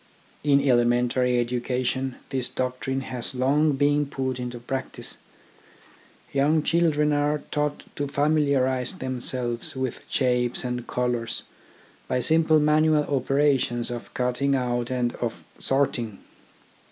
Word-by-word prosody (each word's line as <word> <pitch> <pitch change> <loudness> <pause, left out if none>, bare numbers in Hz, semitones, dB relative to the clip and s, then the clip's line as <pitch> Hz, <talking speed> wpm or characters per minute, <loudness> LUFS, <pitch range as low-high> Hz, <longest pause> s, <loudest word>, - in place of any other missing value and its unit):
In 140 -1 +3
elementary 125 0 +3
education 125 +2 -1
this 130 -2 -2
doctrine 130 +1 -2
has 130 -1 -5
long 145 +4 +3
been 145 +1 +2
put 130 -2 -3
into 125 0 -4
practice. 130 +2 -5 1.2
Young 145 +3 +3
children 155 -3 +2
are 145 +1 +1
taught 150 0 -1
to 145 - -1
familiarise 140 -3 +1
themselves 125 -4 -2
with 130 -2 -3
shapes 125 -2 +1
and 125 -1 -3
colours 120 -2 -2 0.6
by 125 - 0
simple 155 +4 +4
manual 150 0 +4
operations 135 -3 +1
of 120 -1 -6
cutting 125 +3 +1
out 120 -2 -1
and 125 -2 0
of 115 -2 -4 0.2
sorting. 120 -6 0
130 Hz, 115 wpm, -25 LUFS, 125-145 Hz, 1.2 s, simple